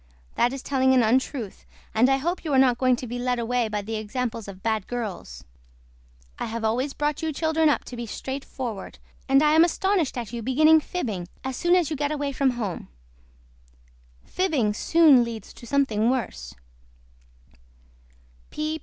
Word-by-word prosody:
THAT 240 - +2
IS 270 - -6
TELLING 260 -1 +2
AN 250 - +4
UNTRUTH 240 -1 -1 0.3
AND 240 +4 +4
I 270 - +3
HOPE 345 +7 -2
YOU 310 -4 -2
ARE - - +4
NOT 255 -2 +4
GOING 255 -1 +3
TO 250 - -7
BE 245 +1 -5
LED 250 0 0
AWAY 240 0 0
BY 210 -1 -2
THE 220 +2 -4
EXAMPLES 225 +1 -4
OF 190 -1 -10
BAD 220 -3 -1
GIRLS. 195 - -5 1.0
I - - -2
HAVE 225 0 -5
ALWAYS 250 +6 0
BROUGHT 295 0 -1
YOU 320 -1 -1
CHILDREN 320 +1 +1
UP 290 - +1
TO 250 - -9
BE 235 -1 -6
STRAIGHTFORWARD 260 -4 -6 0.3
AND 275 +2 +5
I 300 - +4
AM 320 +2 +6
ASTONISHED 350 -4 0
AT 235 -2 -5
YOU 235 - -4
BEGINNING 310 +7 +5
FIBBING 220 - -4 0.2
AS 265 -1 -3
SOON 345 +6 +3
AS 345 -4 +1
YOU - - -1
GET 290 +1 -1
AWAY 290 -2 -2
FROM 275 0 +1
HOME. 230 -7 -4 1.4
FIBBING 295 - 0
SOON 300 +1 +5
LEADS 230 -3 -7
TO 235 - -13
SOMETHING 235 -5 +1
WORSE. 145 - -3
255 Hz, 170 wpm, -25 LUFS, 225-290 Hz, 1.4 s, AM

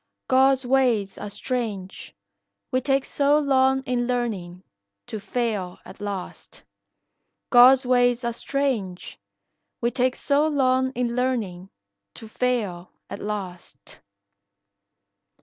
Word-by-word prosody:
God's 265 0 +3
ways 245 -6 +1
are 210 - -6
strange, 210 -5 -5 0.6
we 255 - +1
take 270 0 +1
so 285 +1 +2
long 265 -2 +2
in 245 -2 -1
learnin', 200 -8 -3 0.4
To 220 - -6
fail 205 -3 -3
at - - -13
last. 200 -3 -7 0.9
God's 255 +2 +7
ways 245 0 +2
are 235 0 -1
strange, 235 -8 -3 0.6
we 235 0 0
take 255 +1 +1
so 290 +2 +2
long 260 -3 +2
in 240 -1 -2
learnin', 220 -8 -2 0.5
To 225 - -10
fail 215 -7 -2 0.2
at - - -5
last. 195 -4 -7
245 Hz, 110 wpm, -24 LUFS, 205-260 Hz, 0.9 s, God's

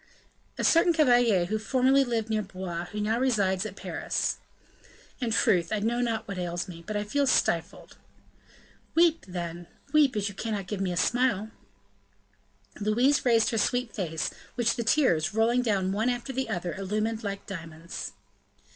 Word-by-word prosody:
"A - - -2
certain 335 +1 +5
cavalier 245 - +4
who 215 +4 -2
formerly 260 +4 +3
lived 230 -3 -1
near 215 -1 0
Blois, 185 -3 -6
and 175 - -5
who 210 +3 -5
now 220 +3 0
resides 205 -6 +1
at 195 - -10
Paris." - - -2 0.8
"In 245 - -1
truth, 180 -6 +2
I 215 - +1
know 230 +4 0
not 230 -2 -1
what 195 -2 -5
ails 175 -1 -3
me, 170 -2 -10
but 210 -1 -2
I 205 - -1
feel 280 +7 0
stifled." - - 0 1.0
"Weep, 330 -1 +4
then, 175 -1 -5 0.3
weep, 290 -5 +4
as 205 -1 0
you 200 - -5
cannot 210 -1 -3
give 195 0 -4
me 190 -2 0
a 175 - -3
smile!" 220 0 +1 1.3
Louise 240 +7 +2
raised 230 -3 +4
her 225 - 0
sweet 245 +1 0
face, 160 -5 -2 0.2
which 240 -2 +1
the 235 - -2
tears, 220 - +2
rolling 235 +3 +3
down 195 -6 0
one 220 +5 +1
after 245 +2 -3
the 260 -2 -2
other, 175 -4 -2
illumined 215 +4 -2
like 200 -1 -4
diamonds. 165 -3 -7
215 Hz, 170 wpm, -27 LUFS, 190-245 Hz, 1.3 s, certain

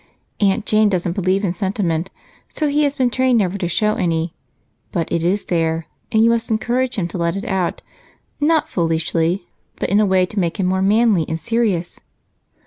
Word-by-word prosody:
Aunt 205 +1 +2
Jane 215 0 +3
doesn't 180 -3 -1
believe 190 +2 0
in 175 - 0
sentiment, 185 -2 -1 0.4
so 305 - 0
he 295 +1 +1
has 285 0 -1
been 250 -2 +1
trained 255 -1 +2
never 195 -3 +1
to 175 - -1
show 210 +5 +1
any, 165 -3 -1 0.6
but 170 -2 -1
it 170 - 0
is 190 +4 0
there, 165 -1 0 0.3
and 220 0 +4
you 230 - +5
must 230 -1 0
encourage 245 +3 0
him 185 -6 -1
to 175 - -5
let 170 +1 0
it 195 - -4
out, 190 -3 -2 0.6
not 310 +1 +2
foolishly, 165 +1 0 0.3
but - - -3
in 205 - +4
a 215 - +4
way 190 -1 +3
to 200 +3 -4
make 175 +2 -1
him 190 - +1
more 190 +1 +1
manly 210 -2 +3
and 160 0 -2
serious." 200 -3 -1
190 Hz, 195 wpm, -19 LUFS, 170-220 Hz, 0.6 s, you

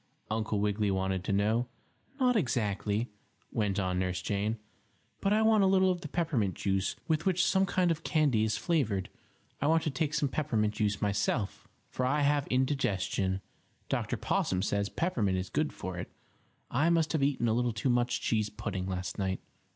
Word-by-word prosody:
Uncle 110 -1 0
Wiggily 105 0 +1
wanted 95 -1 0
to 100 - -2
know. 110 +5 +2 0.5
"Not 250 -2 +3
exactly," 110 - 0 0.4
went 105 -4 0
on 90 -2 0
Nurse 90 -1 -1
Jane. 105 +2 -1 0.6
"But 195 - 0
I 215 +1 +4
want 220 -2 +5
a - - +5
little 190 0 +4
of 175 -1 -3
the 155 - -5
peppermint 145 - 0
juice 95 0 0
with 160 +2 +1
which 180 -2 +3
some 190 0 +3
kind 180 -2 +2
of 165 0 -2
candy 145 -9 +2
is 110 -1 0
flavored. 110 - 0 0.5
I 145 - +2
want 160 +1 +3
to 155 - 0
take 150 +3 -1
some 150 -1 +2
peppermint 110 -7 0
juice 105 -1 0
myself, 100 +1 -1 0.2
for 130 - -2
I 140 +4 +2
have 145 0 +2
indigestion. 100 -8 0 0.5
Dr. - - -1
Possum 95 0 0
says 100 0 0
peppermint 110 - 0
is 90 0 -4
good 155 0 0
for 95 -1 -6
it. - - -6 0.6
I 145 +7 +3
must 165 -2 +2
have 160 - 0
eaten 135 -4 +1
a 110 - +2
little 120 +1 +1
too 110 +4 -1
much 120 0 +1
cheese 110 -2 +1
pudding 95 -3 -4
last 95 +2 -4
night." 95 -1 -1
115 Hz, 180 wpm, -30 LUFS, 100-155 Hz, 0.6 s, want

